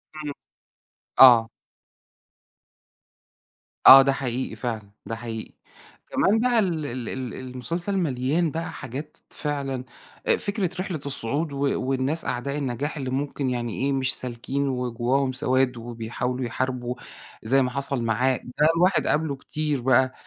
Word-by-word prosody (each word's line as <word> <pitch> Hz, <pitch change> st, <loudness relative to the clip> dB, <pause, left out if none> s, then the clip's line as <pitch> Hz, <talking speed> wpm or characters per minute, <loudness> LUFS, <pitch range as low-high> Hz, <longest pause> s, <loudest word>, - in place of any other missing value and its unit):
إمم، 150 Hz, -2 st, -5 dB, 0.9 s
آه. 120 Hz, -3 st, +8 dB, 2.4 s
آه، 135 Hz, -, +12 dB
ده 135 Hz, 0 st, +3 dB
حقيقي 130 Hz, -1 st, -3 dB
فعلًا، 110 Hz, -5 st, -4 dB, 0.2 s
ده 115 Hz, -, -4 dB
حقيقي، 115 Hz, -1 st, -7 dB, 0.6 s
كمان 210 Hz, +4 st, +3 dB
بَقَى 245 Hz, -1 st, +3 dB
ال 165 Hz, -7 st, 0 dB
ال 125 Hz, -3 st, -5 dB
ال 130 Hz, -2 st, -5 dB
المُسلسل 165 Hz, +10 st, -4 dB
مليان 150 Hz, +1 st, 0 dB
بقى 165 Hz, +2 st, -4 dB
حاجات 140 Hz, +4 st, -7 dB
فعلًا، 140 Hz, -3 st, -3 dB, 0.4 s
آآ -, -, +4 dB
فكرة 200 Hz, -3 st, -1 dB
رحلة 180 Hz, -5 st, -4 dB
الصُّعود 140 Hz, +3 st, +2 dB
و 140 Hz, 0 st, 0 dB
والناس 135 Hz, +5 st, +1 dB
أعداء 140 Hz, +3 st, -2 dB
النَّجاح، 140 Hz, +3 st, -3 dB
اللي 130 Hz, -2 st, -3 dB
ممكن 135 Hz, 0 st, -2 dB
يعني 120 Hz, -3 st, -3 dB
إيه، 140 Hz, -, +1 dB
مش 130 Hz, -1 st, +2 dB
سالكين، 130 Hz, +3 st, -2 dB
وجُوَّاهُم 125 Hz, +1 st, 0 dB
سواد 130 Hz, 0 st, +1 dB
وبيحاولوا 120 Hz, +2 st, -4 dB
يحاربوا، 125 Hz, 0 st, -3 dB, 0.5 s
زي 135 Hz, +5 st, +3 dB
ما 125 Hz, -, +1 dB
حصل 140 Hz, -2 st, -1 dB
معاه، 125 Hz, +3 st, +1 dB
ده 145 Hz, +5 st, 0 dB
الواحد 180 Hz, +3 st, +3 dB
قابلُه 150 Hz, -2 st, +1 dB
كتير 150 Hz, -1 st, -3 dB
بقى. 130 Hz, +1 st, +3 dB
130 Hz, 135 wpm, -25 LUFS, 125-145 Hz, 2.4 s, آه